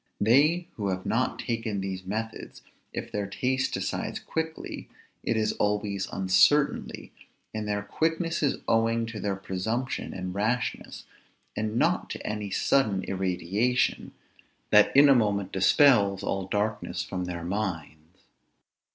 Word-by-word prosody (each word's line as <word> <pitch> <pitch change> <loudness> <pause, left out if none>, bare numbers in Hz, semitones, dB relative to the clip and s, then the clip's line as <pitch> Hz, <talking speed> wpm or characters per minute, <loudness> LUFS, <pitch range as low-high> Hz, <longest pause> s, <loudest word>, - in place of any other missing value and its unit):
They 150 +11 +4
who 105 -3 -2
have 95 -1 -2
not 125 +2 0
taken 115 -4 -2
these 95 -1 -4
methods, 110 +3 -5 0.3
if - - -6
their 105 -1 -2
taste 130 +5 -1
decides 95 0 -3
quickly, 160 0 -5 0.3
it 115 - 0
is 110 -1 +1
always 105 -1 -1
uncertainly; 95 +10 +2 0.4
and 110 -1 -3
their 105 0 -1
quickness 165 - -1
is 145 - 0
owing 115 0 +2
to 115 -1 -6
their 100 0 -1
presumption 110 +7 -3
and 90 -1 -5
rashness, 110 +5 -2 0.5
and 110 +1 -2
not - - +1
to - - -6
any 105 -1 -3
sudden 100 -2 +1
irradiation, 95 +6 0 0.6
that 105 -1 +6
in 145 +1 +9
a 140 - +7
moment 100 -5 +1
dispels 100 -1 +4
all 95 -1 -2
darkness 105 -3 -2
from 90 -1 -4
their 85 -1 -5
minds. 85 -3 -5
105 Hz, 135 wpm, -27 LUFS, 95-120 Hz, 0.6 s, in